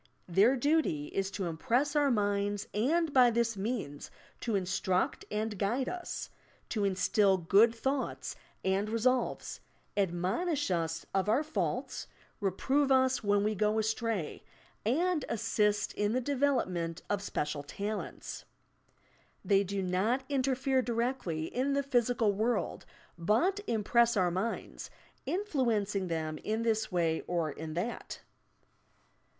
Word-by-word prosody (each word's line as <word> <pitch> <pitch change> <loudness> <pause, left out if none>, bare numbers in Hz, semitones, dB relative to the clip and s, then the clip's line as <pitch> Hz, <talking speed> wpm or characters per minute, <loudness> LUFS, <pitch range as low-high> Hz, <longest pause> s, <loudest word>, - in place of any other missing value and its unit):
Their 200 +9 +4
duty 270 - +1
is 195 0 -1
to 195 -1 -4
impress 240 - 0
our 290 -1 +4
minds, 205 -3 0
and 300 +8 +1
by 250 -2 +7
this 230 -1 +1
means 195 - -4 0.3
to 230 -3 -1
instruct 185 -1 0
and 210 -1 -2
guide 240 +7 0
us, 355 -1 -5 0.4
to 215 -3 -1
instil 195 +1 +3
good 200 +7 +4
thoughts 270 +4 -2 0.3
and 195 +2 +1
resolves, 245 +2 0 0.4
admonish 195 - 0
OS 165 -1 -1
of 195 +1 +1
our 250 +8 +3
faults, 310 - -2 0.3
reprove 265 +9 +1
us 260 -1 +3
when 205 0 +3
we 215 +1 +1
go 210 +1 +1
astray 220 -5 -1 0.4
and 320 - +1
assist 210 -2 +1
in 210 +1 0
the 255 - +2
development 240 - 0
of 205 -1 -1
special 150 -6 -2
talents. 200 +9 -5 1.0
They 200 -1 +4
do 195 0 -2
not 200 +9 +1
interfere 265 -1 +1
directly 235 -10 -1
in 260 +9 -1
the 280 0 +1
physical 245 -5 +2
world, 225 +4 -1 0.3
but 235 - +2
im 220 -2 0
press 235 +1 +4
our 180 -2 +3
minds, 195 +6 -3 0.4
influencing 230 - 0
them 155 -2 -3
in 220 +2 -2
this 220 -2 0
way 165 -3 +1
or 170 -3 0
in 155 +2 -7
that. 205 +8 -4
215 Hz, 130 wpm, -31 LUFS, 190-255 Hz, 1.0 s, by